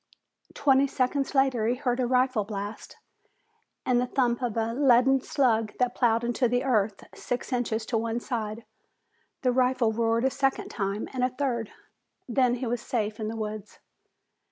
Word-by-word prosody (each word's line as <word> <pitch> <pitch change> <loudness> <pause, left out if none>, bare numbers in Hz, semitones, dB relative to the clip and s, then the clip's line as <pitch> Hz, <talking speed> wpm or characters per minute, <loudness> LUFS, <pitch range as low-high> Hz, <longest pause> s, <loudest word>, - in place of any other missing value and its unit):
Twenty 275 0 +4
seconds 270 +1 -1
later 260 -5 +2
he 240 - +2
heard 250 -2 -1
a 250 - +1
rifle 255 -3 +2
blast, 205 +1 -7 0.9
and 245 -1 +3
the 250 - -1
thump 245 -1 0
of 235 -3 -2
a 225 0 0
leaden 265 0 +4
slug 225 -6 +1
that 250 -1 +1
plowed 230 -1 +2
into 240 +1 +1
the 245 +2 0
earth 215 -6 0
six 250 +1 -4
inches 230 -2 -1
to 225 -1 0
one 230 +1 -2
side. 225 -2 -4 0.8
The 250 - +3
rifle 250 -2 +2
roared 230 +2 +1
a 265 - +2
second 270 0 -1
time, 200 0 -3
and 255 -1 -1
a 255 - +3
third. 250 -4 -2 0.6
Then 250 0 +2
he 255 - -4
was 240 -1 -2
safe 220 -5 -2
in 215 - -3
the 225 +1 -4
woods. 215 -1 -6
245 Hz, 170 wpm, -27 LUFS, 225-255 Hz, 0.9 s, Twenty